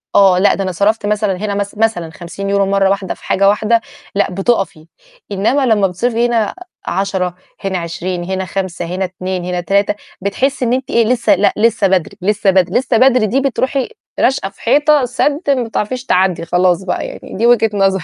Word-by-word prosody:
آه، 190 -2 +5
لأ 205 - +4
ده 195 - -2
أنا 185 - -2
صرَفت 205 +5 0
مثلًا 210 -2 0
هنا 205 +1 -3
مث 200 0 -4
مثلًا 215 -7 0
50€ 195 +5 -2
مرّه 195 0 +2
واحدة 195 -1 -1
في - - -20
حاجة 195 +1 +3
واحدة، 220 +3 +2 0.3
لأ 200 - +1
بتقَفي، 195 -4 -1 0.5
إنّما 225 +8 +1
لمّا 210 -5 +3
بتصرفي 230 +6 0
هنا 225 -3 0 0.3
10 190 -1 -1 0.3
هنا 190 -1 -1
20 175 +1 -4
هنا 190 +1 -3
5 185 -1 -4
هنا 185 +2 -2
2 185 0 -5
هنا 180 0 -2
3 200 +3 +1 0.3
بتحسي 255 +7 -1
إن 235 - +1
أنتِ 255 0 -2
إيه؟ 230 -1 +3
لسه 240 0 +3
لأ، 205 - +2
لسه 225 -1 +3
بدري 185 -3 0
لسه 205 +1 +1
بدري 185 +3 +2
لسه 255 -2 0
بدري، 255 -2 +4
دي 260 +6 +1
بترُوحي 270 +1 -1 0.3
راشقة 260 -7 +1
في - - -22
حيطة 290 +2 +3
سَدّ، 285 +5 0
ما 260 -3 +2
بتعرفيش 240 +3 -3
تعدّي 185 -2 +1
خلاص 180 +1 +2
بقى، 185 - -2
يعني - - -10
دي 225 - +1
وجهة 240 -2 +4
نظري." 195 -2 +1
200 Hz, 190 wpm, -16 LUFS, 185-230 Hz, 0.5 s, آه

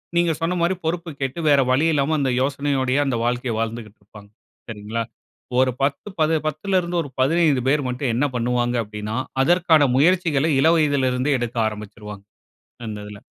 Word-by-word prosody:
நீங்க 170 -1 +3
சொன்ன 175 +2 0
மாரி 175 +2 +1
பொறுப்பு 170 +1 -2
கேட்டு, 135 +4 -3
வேற 140 -1 +5
வழியில்லாம 150 +2 +2
அந்த 135 -2 0
யோசனையோடையே 135 -1 0
அந்த 130 -4 -1
வாழ்க்கைய 120 0 -1
வாழ்ந்துகிட்டு 115 -2 -5
இருப்பாங்க, 100 0 -15 0.4
சரிங்களா? 110 +1 -4 0.6
ஒரு 130 0 +4
10 140 +8 -1
பது 155 +1 +3
பத்துலருந்து 175 +3 -1
ஒரு 145 - -9
15 150 -1 +3
பேர் 145 +2 +2
மட்டும், 125 +1 -2
என்ன 125 +5 +1
பண்ணுவாங்க 120 0 0
அப்படின்னா, 105 +1 -6 0.3
அதற்கான 165 -2 +4
முயற்சிகளை 160 -1 +2
இளவயதுல 150 -4 +3
இருந்தே 130 +3 0
எடுக்க 120 0 -4
ஆரம்பிச்சுருவாங்க, 105 -1 -8 0.6
அந்த 105 -1 -5
இதுல. 105 0 -10
135 Hz, 150 wpm, -22 LUFS, 120-160 Hz, 0.6 s, வேற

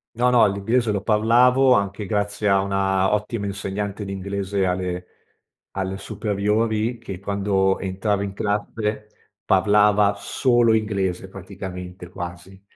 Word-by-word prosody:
No, 125 +2 +2
no, 125 -3 +5
l'inglese 105 +4 0
lo 100 - -1
parlavo, 120 +5 +4
anche 100 -2 0
grazie 105 0 -2
a 100 -1 +4
una 95 0 +1
ottima 105 0 -2
insegnante 100 +1 -4
di 100 - -5
inglese, 100 0 -2
alle 90 0 -2 0.7
alle 95 0 -3
superiori, 110 +3 -1
che 100 -5 -7
quando 100 -1 0
entrava 95 +2 -1
in 100 -1 -4
classe, 105 +1 -2 0.4
parlava 105 +1 +4
solo 120 +1 +2
inglese 95 -4 -1
praticamente 90 -2 -8
quasi, 90 +2 -8
100 Hz, 120 wpm, -22 LUFS, 95-105 Hz, 0.7 s, no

